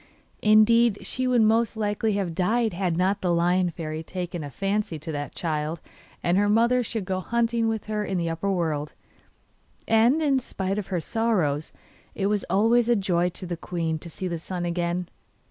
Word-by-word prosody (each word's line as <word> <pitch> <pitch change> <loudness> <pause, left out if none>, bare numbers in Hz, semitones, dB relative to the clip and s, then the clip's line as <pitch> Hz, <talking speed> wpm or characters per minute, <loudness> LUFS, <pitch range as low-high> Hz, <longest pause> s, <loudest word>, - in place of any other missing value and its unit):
Indeed, 215 +1 +4
she 255 0 -1
would 245 -3 +4
most 225 +1 +2
likely 210 0 0
have 195 -4 -1
died 220 +5 +1
had 175 -2 -1
not 190 +3 +1
the 180 - +1
Lion 175 +1 +2
Fairy 155 -2 -5
taken 175 -1 -5
a 145 - -6
fancy 195 +2 -2
that 150 -1 -5
the - - -18
child 155 0 -2 0.4
and 175 +3 +3
her 205 0 +2
mother 235 +4 +3
should 225 -4 -4
go 185 0 -1
hunting 230 +3 0
with 220 -1 -1
her 215 -1 -2
in 195 -2 -2
the 170 -1 -1
upper 165 +4 -1
world, 155 -5 -2 0.9
and, 230 +7 +4
in 280 -4 +2
spite 195 -4 -3
of 205 - -5
her 180 -3 -2
sorrows, 170 -9 0 0.4
it 195 - -1
was 205 0 +1
always 225 +5 +3
a 240 - +5
joy 180 -4 +1
to 180 - -6
the 175 -1 -3
queen 165 -2 -3
to 170 - -9
see 185 +3 -5
the 170 -2 -3
sun 175 +1 -4
again. 175 +1 -1
190 Hz, 190 wpm, -25 LUFS, 170-220 Hz, 0.9 s, a